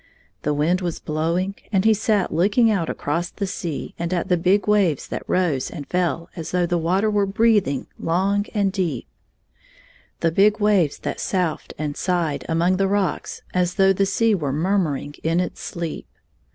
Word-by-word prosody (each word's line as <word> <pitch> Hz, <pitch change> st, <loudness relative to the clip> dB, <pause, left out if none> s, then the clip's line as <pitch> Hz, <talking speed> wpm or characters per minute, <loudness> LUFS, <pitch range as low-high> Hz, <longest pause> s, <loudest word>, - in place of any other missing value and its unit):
The 150 Hz, 0 st, 0 dB
wind 170 Hz, +6 st, +1 dB
was 175 Hz, -2 st, -2 dB
blowing, 170 Hz, +5 st, -1 dB, 0.2 s
and 195 Hz, -1 st, +2 dB
he 220 Hz, -, +6 dB
sat 210 Hz, -2 st, 0 dB
looking 205 Hz, +7 st, +3 dB
out 180 Hz, -6 st, 0 dB
across 170 Hz, +4 st, -2 dB
the 200 Hz, -, -4 dB
sea 175 Hz, -5 st, -4 dB
and 170 Hz, +1 st, -2 dB
at 185 Hz, +2 st, -1 dB
the 180 Hz, -, +4 dB
big 185 Hz, +5 st, +2 dB
waves 195 Hz, -9 st, +2 dB
that -, -, -4 dB
rose 165 Hz, -8 st, +1 dB
and 150 Hz, -5 st, -7 dB
fell 170 Hz, -2 st, -1 dB
as 165 Hz, -2 st, -5 dB
though 180 Hz, -1 st, +1 dB
the 175 Hz, 0 st, 0 dB
water 185 Hz, +6 st, +1 dB
were 205 Hz, -2 st, +2 dB
breathing 205 Hz, -, +2 dB
long 195 Hz, +5 st, +1 dB
33 215 Hz, -, -5 dB
and 195 Hz, -1 st, +2 dB
deep, 185 Hz, -4 st, -2 dB, 0.6 s
— -, -, -30 dB
the 165 Hz, -, +2 dB
big 210 Hz, +5 st, +4 dB
waves 200 Hz, -8 st, +2 dB
that -, -, -4 dB
soughed 180 Hz, -5 st, -2 dB
and 150 Hz, -1 st, -3 dB
sighed 170 Hz, -5 st, -1 dB
among 170 Hz, +3 st, +2 dB
the 195 Hz, 0 st, +2 dB
rocks 195 Hz, -1 st, -1 dB
as 180 Hz, -1 st, +1 dB
though 195 Hz, 0 st, +5 dB
the 195 Hz, +1 st, +1 dB
sea 225 Hz, +3 st, +2 dB
were 150 Hz, -8 st, -1 dB
murmuring 155 Hz, -3 st, 0 dB
in 165 Hz, +2 st, +1 dB
its 180 Hz, -2 st, -3 dB
sleep. 170 Hz, -2 st, -5 dB
180 Hz, 185 wpm, -22 LUFS, 165-200 Hz, 0.6 s, he